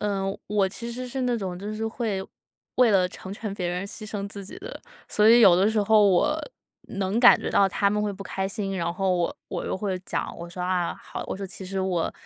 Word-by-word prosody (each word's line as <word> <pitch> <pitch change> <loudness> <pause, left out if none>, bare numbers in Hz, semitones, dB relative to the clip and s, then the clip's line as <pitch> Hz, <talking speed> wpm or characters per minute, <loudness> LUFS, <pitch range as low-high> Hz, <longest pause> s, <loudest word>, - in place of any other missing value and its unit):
呃， 200 -2 -1 0.2
我 200 -2 +2
其 235 +4 -6
实 250 +2 -5
是 265 +1 -3
那 245 -1 +1
种 185 -4 -4
就 205 +2 -5
是 220 +1 -2
会， 220 -4 -2 0.5
为 250 -3 +5
了 185 -2 +3
成 190 +1 -9
全 205 0 -5
别 180 -3 -3
人 180 +2 -3
牺 215 +1 -8
牲 200 -1 -4
自 200 -1 -8
己 285 - -10
的。 470 +5 -8 0.3
所 210 +1 +4
以 235 +1 +8
有 180 -5 +8
的 195 +3 +4
时 215 -1 +2
候 210 0 +5
我 180 -2 +3 0.6
能 195 +3 0
感 245 - +8
觉 - - -3
到 195 -1 +4
他 200 +2 +1
们 210 0 0
会 205 -1 -1
不 195 +1 -8
开 190 0 -2
心， 195 -1 -3
然 170 -1 -1
后 190 0 +1
我 175 -1 -1
我 - - -4
又 - - -2
会 190 -1 -2
讲， - - -3
我 170 0 -8
说 180 - -7
“啊！ 180 -1 0
好”， - - -7
我 - - -3
说 195 0 -5
“其 190 +1 -8
实 190 +1 -3
我“， 180 -3 -1
200 Hz, 265 characters per minute, -25 LUFS, 185-215 Hz, 0.6 s, 以